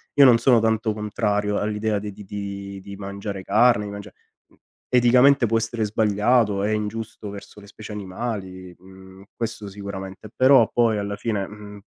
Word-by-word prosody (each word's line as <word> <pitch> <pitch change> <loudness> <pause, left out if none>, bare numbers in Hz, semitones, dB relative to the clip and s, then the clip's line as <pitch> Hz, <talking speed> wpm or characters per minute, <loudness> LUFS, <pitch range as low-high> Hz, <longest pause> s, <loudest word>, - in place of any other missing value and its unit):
io 140 - +7
non 120 -3 +6
sono 120 -1 +4
tanto 110 -1 0
contrario 105 -1 -1
all'idea 105 0 -1
di 105 0 -6
di 105 +1 -12
di 100 0 -6
di 100 +1 -9
mangiare 100 0 -6
carne, 105 +1 +3
di 100 - -6
mangiare 100 0 -9 0.3
mhmm, - - -28 0.3
eticamente 125 +2 +5
può 115 0 +1
essere 115 0 -2
sbagliato, 105 0 +2
è 105 - 0
ingiusto 105 0 -4
verso 100 +1 -11
le 100 - -14
specie 110 +1 -11
animali, 95 -3 -6
mhmm, 95 +1 -15
questo 115 -3 -4
sicuramente. 100 0 -8
Però 130 -3 +6
poi 115 -3 +2
alla 100 0 -3
fine, 105 -4 -2
mhmm 105 0 -11
105 Hz, 165 wpm, -23 LUFS, 100-115 Hz, 0.3 s, io